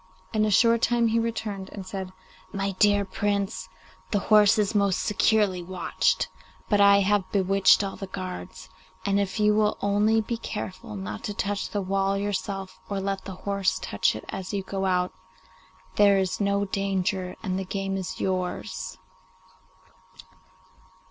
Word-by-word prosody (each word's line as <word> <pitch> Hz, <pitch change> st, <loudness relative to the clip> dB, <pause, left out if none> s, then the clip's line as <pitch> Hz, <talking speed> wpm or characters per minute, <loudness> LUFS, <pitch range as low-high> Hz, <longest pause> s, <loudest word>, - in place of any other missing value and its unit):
In 215 Hz, -1 st, +2 dB
a -, -, +1 dB
short 230 Hz, +3 st, +4 dB
time 235 Hz, -1 st, +3 dB
he 230 Hz, +1 st, +2 dB
returned 215 Hz, -4 st, -3 dB
and 195 Hz, -2 st, -7 dB
said, 190 Hz, -1 st, -5 dB, 0.4 s
'My 195 Hz, 0 st, -1 dB
dear 205 Hz, -1 st, +4 dB
Prince, 200 Hz, 0 st, -2 dB, 0.4 s
the 210 Hz, -, +1 dB
horse 210 Hz, +1 st, +5 dB
is 210 Hz, 0 st, +1 dB
most 200 Hz, -3 st, +2 dB
securely 210 Hz, -3 st, +2 dB
watched, 185 Hz, +1 st, 0 dB, 0.4 s
but 205 Hz, -1 st, +4 dB
I 200 Hz, 0 st, +7 dB
have 200 Hz, -1 st, +1 dB
bewitched 195 Hz, +1 st, +4 dB
all 195 Hz, -, -4 dB
the 195 Hz, -, -6 dB
guards, 185 Hz, -, -7 dB, 0.4 s
and 200 Hz, 0 st, +2 dB
if 200 Hz, +1 st, -2 dB
you 210 Hz, 0 st, +4 dB
will 210 Hz, 0 st, +2 dB
only 205 Hz, +2 st, +2 dB
be 230 Hz, +2 st, -2 dB
careful 185 Hz, -, -6 dB
not 100 Hz, +1 st, -6 dB
to 205 Hz, -, -4 dB
touch 200 Hz, 0 st, -2 dB
the 205 Hz, -1 st, -2 dB
wall 195 Hz, +1 st, 0 dB
yourself, 195 Hz, -1 st, -3 dB
or 200 Hz, -1 st, -2 dB
let 195 Hz, 0 st, -3 dB
the 190 Hz, -, -6 dB
horse 200 Hz, -2 st, +1 dB
touch -, -, 0 dB
it -, -, -8 dB
as 190 Hz, +2 st, -5 dB
you 195 Hz, -, -2 dB
go 195 Hz, 0 st, -2 dB
out, 180 Hz, -1 st, +1 dB, 0.8 s
there 200 Hz, -1 st, +6 dB
is 190 Hz, +1 st, -1 dB
no 200 Hz, 0 st, +1 dB
danger 190 Hz, -1 st, -1 dB
and 190 Hz, -3 st, -1 dB
the -, -, -2 dB
game 195 Hz, +1 st, -3 dB
is 190 Hz, -1 st, -4 dB
yours. 185 Hz, -1 st, -3 dB
200 Hz, 160 wpm, -26 LUFS, 190-205 Hz, 0.8 s, I